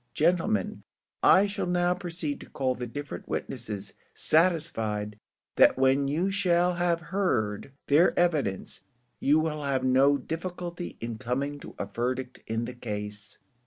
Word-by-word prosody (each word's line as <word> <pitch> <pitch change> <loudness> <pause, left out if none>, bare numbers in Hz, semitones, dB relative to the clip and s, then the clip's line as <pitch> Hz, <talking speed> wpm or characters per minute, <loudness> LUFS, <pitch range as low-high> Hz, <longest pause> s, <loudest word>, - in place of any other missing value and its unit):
Gentlemen, 190 +6 +1 0.4
I 190 +2 +6
shall 200 -2 -3
now 175 0 +2
proceed 170 -5 -4
to - - -11
call 130 -2 0
the 125 -1 -5
different 145 +4 -7
witnesses, 105 -5 -4 0.2
satisfied 115 - +1 0.4
that - - +6
when 135 +1 +3
you 170 +7 0
shall 180 -2 +2
have 175 -1 +1
heard 120 - 0
their 155 +5 +4
evidence, 150 - 0 0.4
you 150 +3 +4
will 155 -1 -1
have 135 -2 0
no 135 +2 +4
difficulty 175 +2 -5
in 115 -1 -4
coming 140 +5 -2
to - - -10
a - - -2
verdict 125 +4 -3
in 115 +1 -1
the 125 - -6
case." 105 -3 -5
145 Hz, 140 wpm, -28 LUFS, 120-175 Hz, 0.4 s, I